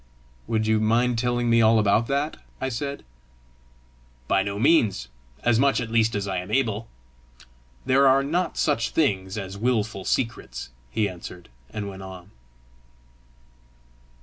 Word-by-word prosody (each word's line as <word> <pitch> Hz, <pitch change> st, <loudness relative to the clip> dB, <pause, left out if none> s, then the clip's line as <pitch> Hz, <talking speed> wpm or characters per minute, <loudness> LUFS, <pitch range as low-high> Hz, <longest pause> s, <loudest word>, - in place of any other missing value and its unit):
"Would 110 Hz, -1 st, 0 dB
you 110 Hz, 0 st, +3 dB
mind 115 Hz, +2 st, +2 dB
telling 120 Hz, 0 st, 0 dB
me 115 Hz, 0 st, +4 dB
all 110 Hz, 0 st, +5 dB
about 110 Hz, +2 st, +3 dB
that?" 140 Hz, +3 st, -1 dB, 0.2 s
I 130 Hz, -, -1 dB
said. 140 Hz, +3 st, -4 dB, 1.2 s
"By 95 Hz, -, +3 dB
no 100 Hz, +1 st, -3 dB
means 105 Hz, -, +3 dB, 0.3 s
as 120 Hz, -1 st, +3 dB
much 140 Hz, +1 st, +3 dB
at 115 Hz, -2 st, -4 dB
least 115 Hz, -1 st, +2 dB
as 100 Hz, -1 st, -2 dB
I 95 Hz, -1 st, -2 dB
am 90 Hz, +2 st, -7 dB
able: 110 Hz, -2 st, 0 dB, 1.0 s
there 135 Hz, +2 st, +4 dB
are 135 Hz, +1 st, +5 dB
not 165 Hz, +4 st, -1 dB
such 115 Hz, -, +1 dB
things 95 Hz, -10 st, 0 dB
as 100 Hz, -1 st, -6 dB
wilful 110 Hz, -4 st, 0 dB
secrets," 65 Hz, -, -2 dB, 0.2 s
he 105 Hz, -, 0 dB
answered 90 Hz, -2 st, -9 dB, 0.2 s
and 105 Hz, -1 st, -5 dB
went 95 Hz, -1 st, -8 dB
on. 95 Hz, -2 st, -10 dB
110 Hz, 145 wpm, -25 LUFS, 100-125 Hz, 1.2 s, all